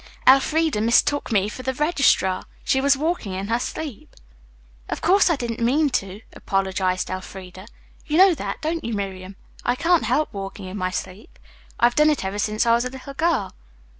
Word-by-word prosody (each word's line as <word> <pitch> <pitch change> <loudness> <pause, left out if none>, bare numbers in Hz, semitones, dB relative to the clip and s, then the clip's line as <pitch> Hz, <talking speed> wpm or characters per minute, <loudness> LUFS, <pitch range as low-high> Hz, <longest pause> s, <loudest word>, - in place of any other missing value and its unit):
Elfreda 285 -1 +4
mistook 240 +5 +2
me 200 -2 +2
for 215 - -7
the 260 0 -3
registrar. 275 - +2 0.2
She 265 - +1
was 280 0 +3
walking 305 - -2
in 195 +2 -4
her 230 +1 +1
sleep." 280 -2 -6 0.7
"Of - - -3
course 380 +3 +4
I 335 - +3
didn't 240 -3 -4
mean 275 +5 +2
to," 195 -2 -3
apologized 190 -1 -1
Elfreda, 185 +1 -8 0.4
"You 310 0 0
know 380 0 +7
that, 315 - -5
don't 325 +2 -2
you, 230 -1 -3
Miriam? 190 -1 -5 0.3
I - - +1
can't 340 +5 +2
help 305 - 0
walking 195 0 -7
in 185 +1 -7
my 185 -2 -1
sleep. 185 +3 -7 0.4
I've 240 0 +4
done 300 +2 +4
it 295 -10 0
ever 195 +2 -3
since 215 +2 0
I 230 - +4
was 235 +1 +2
a - - -2
little 265 +2 -9
girl." 325 0 0
235 Hz, 185 wpm, -22 LUFS, 195-300 Hz, 0.7 s, know